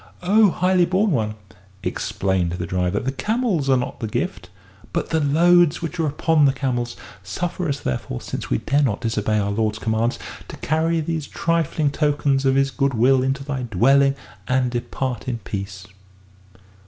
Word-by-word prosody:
"O 205 +3 +5
highly 180 0 +2
born 190 +4 +1
one," 110 -6 0 0.5
explained 95 -3 -1
the 90 - -3
driver, 90 +2 0
"the 130 - -2
camels 205 - -1
are 130 - +5
not 125 - -4
a 110 - -2
gift 90 -3 -3 0.4
but 170 - -2
the 160 - +2
loads 170 +3 +4
which 170 +1 -4
are 160 - +2
upon 150 +1 +2
the 135 - +4
camels. 120 -3 -2 0.2
Suffer 170 - -3
us, 140 0 -2
therefore, 65 -1 -3
since - - -6
we - - +2
dare 140 - +1
not 115 -8 0
disobey 110 -2 0
our 100 -1 0
lord's 110 +1 0
commands, 110 +2 0 0.3
to - - -9
carry 160 +2 0
these 160 -1 -3
trifling 165 -3 0
tokens 145 -2 +1
of 135 0 +3
his 135 0 +2
good 140 -2 0
will 130 +3 +4
into 135 +1 -1
thy 135 -2 -3
dwelling 135 +5 +3 0.3
and 130 -1 +1
depart 125 +1 -3
in 125 -2 -1
peace." 100 -3 -6
135 Hz, 170 wpm, -22 LUFS, 110-160 Hz, 0.5 s, O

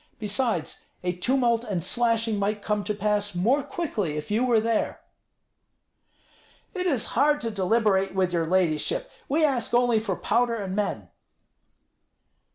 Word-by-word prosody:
Besides, 210 -4 -2 0.2
a 180 - 0
tumult 240 +3 +1
and 195 -8 -3
slashing 230 0 +1
might 205 +1 -1
come 210 -1 -1
to 210 - -1
pass 205 -1 -1
more 235 +11 +2
quickly 215 - -3
if 150 - -6
you 220 +4 +2
were 240 -3 +3
there." 225 0 -1 1.7
"It 365 -2 -2
is 270 -10 0
hard 295 +4 +3
to 230 - -2
deliberate 195 -1 +1
with 185 -2 +1
your 165 -2 0
ladyship. 170 -4 0 0.2
We 310 +3 +3
ask 250 -5 0
only 240 -2 +3
for 205 -4 -2
powder 235 +4 +1
and 195 -4 -4
men." 210 0 -2
215 Hz, 145 wpm, -26 LUFS, 195-240 Hz, 1.7 s, were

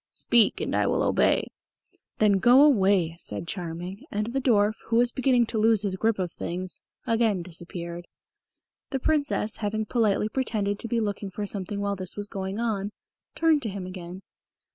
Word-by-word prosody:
"Speak, 235 -3 +3
and - - -2
I - - +2
will - - +1
obey." - - +2 0.7
"Then 205 -2 +4
go 250 +6 +7
away," 195 - +3
said 105 +2 -5
Charming; 180 +1 -5
and 210 +1 -2
the 270 - 0
dwarf, 215 -4 +3
who 230 - 0
was 240 +1 +4
beginning 255 -2 +3
to 220 -1 -3
lose 220 -1 +4
his 195 -2 -1
grip 220 +3 +1
of 180 -3 -2
things, 180 +3 -5 0.2
again 225 -5 +1
disappeared. 170 0 -7 0.8
The 270 - -1
Princess, 285 -7 0
having 215 +1 -2
politely 210 -2 +1
pretended 215 -5 -1
to - - -4
be 235 0 0
looking 205 -2 -2
for 205 +2 -4
something 200 0 -4
while 200 0 -1
this 185 -2 -5
was 205 0 -3
going 195 +1 -4
on, 210 -4 -1 0.5
turned 320 -3 +3
to 225 - -2
him 195 -2 -5
again. 185 0 -8
205 Hz, 175 wpm, -26 LUFS, 185-230 Hz, 0.8 s, go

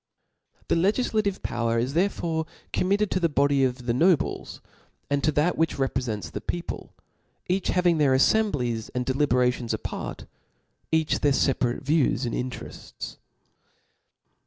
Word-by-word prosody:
The - - +1
legiflative 200 +2 +1
power 115 -1 0
is 125 +4 0
therefore 165 -3 0 0.3
committed 200 +2 +1
tb 185 - 0
the 170 - +3
body 140 -1 +3
of 125 -1 -1
the 120 - +1
nobles, 165 +4 +1 0.5
and 140 0 +1
to 155 - +3
that 155 +5 +1
which 165 0 +2
repfre 135 -1 -1
fents 105 - -8
the - - -5
people, 175 0 -5 0.5
each 185 +1 0
having 175 -3 +2
their 140 -3 +4
aflcmblies 130 - +1
and 125 0 -1
deliberations 125 -3 +1
apart, - - -6 0.7
each 160 -1 +2
their 145 - +3
feparate 125 -2 +1
views 140 -3 +2
and 120 - -3
interefts. 125 0 -6
145 Hz, 135 wpm, -26 LUFS, 125-175 Hz, 0.7 s, their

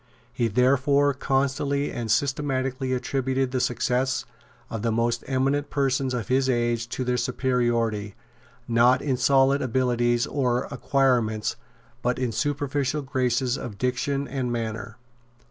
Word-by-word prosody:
He 120 -2 +1
therefore 140 +5 +3
constantly 140 +1 0
and 115 -2 -4
systematically 130 0 0
attributed 130 0 -1
the 130 - 0
success 125 +2 0 0.4
of 115 - -5
the 115 +1 0
most 115 +1 0
eminent 140 +2 0
persons 135 -2 0
of 120 -3 -3
his 130 +1 +2
age 120 -2 0
to 130 - -3
their 125 0 0
superiority, 120 -4 0 0.5
not 120 +2 +4
in 135 -3 +1
solid 135 +2 +3
abilities 120 -1 +1
and 125 -3 0
acquirements, 120 -4 +1 0.5
but 125 0 0
in 125 -2 -1
superficial 145 +3 -1
graces 130 -1 0
of 105 -5 -7
diction 130 +4 -1
and 130 -3 -2
manner. 115 -1 -4
130 Hz, 130 wpm, -25 LUFS, 120-135 Hz, 0.5 s, not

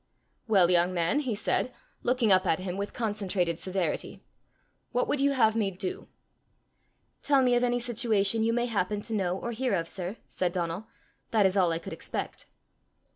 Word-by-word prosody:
"Well, 190 -5 +4
young 175 +1 +3
man," 170 +11 +2
he 255 -7 -2
said, 235 +4 0 0.3
looking 240 -3 +2
up 185 0 +5
at 160 - +3
him 185 -1 -4
with 200 +1 -4
concentrated 195 -7 -1
severity, 185 -4 -2 0.7
"what 250 - +1
would 285 - 0
you 280 0 +3
have 225 -4 +3
me 215 -3 +1
do?" 370 - -5 1.1
"Tell 280 -3 +3
me 250 -1 +3
of 245 0 +3
any 245 0 +2
situation 230 -3 +1
you 225 - +2
may 240 +1 +1
happen 210 -3 -1
to 225 +2 -6
know 185 -3 0
or 235 - -4
hear 245 -1 0
of, 165 -2 -2
sir," 185 +4 -5
said 180 -2 -2
Donal. 175 +3 -3 0.4
"That 215 -3 +3
is 190 0 +2
all 180 -4 +3
I 165 - 0
could 165 - -7
expect." - - -5
205 Hz, 185 wpm, -28 LUFS, 185-240 Hz, 1.1 s, up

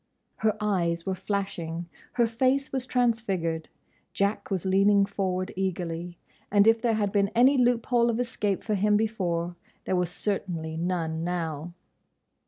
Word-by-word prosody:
Her 220 -1 +1
eyes 170 -5 0
were 190 - 0
flashing; 175 -4 -3 0.3
her 240 - +3
face 260 +4 +1
was 260 -1 -2
transfigured; 195 -11 0 0.4
Jack 200 +2 0
was 190 -3 -2
leaning 200 +1 +4
forward 185 -2 -2
eagerly, 175 -2 -3 0.3
and 205 0 +5
if 225 0 +5
there 230 -2 +2
had 205 -2 0
been 200 -1 +2
any 255 +4 +6
loophole 240 -1 +3
of 230 0 0
escape 210 -5 -1
for 215 - -1
him 210 +1 +3
before, 175 -6 -1 0.3
there 185 - 0
was 180 -2 +1
certainly 175 -4 -3
none 165 -1 -2
now. 170 -1 -3
195 Hz, 145 wpm, -27 LUFS, 175-220 Hz, 0.4 s, any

